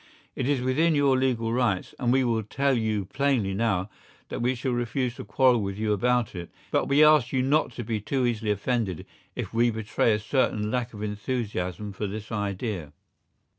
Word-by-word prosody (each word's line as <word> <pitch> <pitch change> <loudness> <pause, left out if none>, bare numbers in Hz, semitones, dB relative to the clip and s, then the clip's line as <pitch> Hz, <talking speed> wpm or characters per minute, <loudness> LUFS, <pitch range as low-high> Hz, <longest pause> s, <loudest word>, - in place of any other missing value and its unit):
It 130 +1 -1
is 140 -3 +1
within 155 +6 +2
your 140 -2 +4
legal 120 -3 0
rights, 120 -7 0
and 120 -2 +1
we 130 +1 +3
will 115 -2 +1
tell 135 +6 0
you 110 -4 0
plainly 130 -3 0
now 100 -3 0 0.4
that - - -4
we 125 +2 +1
shall 130 +2 -2
refuse 120 +1 -1
to 130 - -6
quarrel 125 -4 +3
with 100 -1 -3
you 105 0 +1
about 120 +2 +1
it, 85 -2 -7 0.2
but - - +1
we 140 +2 +5
ask 150 -5 +5
you 130 -1 +1
not 145 +1 +2
to 120 - -5
be 110 -1 -2
too 130 +4 0
easily 115 -3 -1
offended 105 -3 -1 0.3
if - - -5
we 120 +1 +3
betray 110 0 0
a - - +2
certain 105 -2 0
lack 120 -1 -2
of 105 - -6
enthusiasm 105 -2 -3
for 105 +2 -3
this 105 +2 -7
idea. 100 -5 -3
115 Hz, 195 wpm, -26 LUFS, 105-130 Hz, 0.4 s, we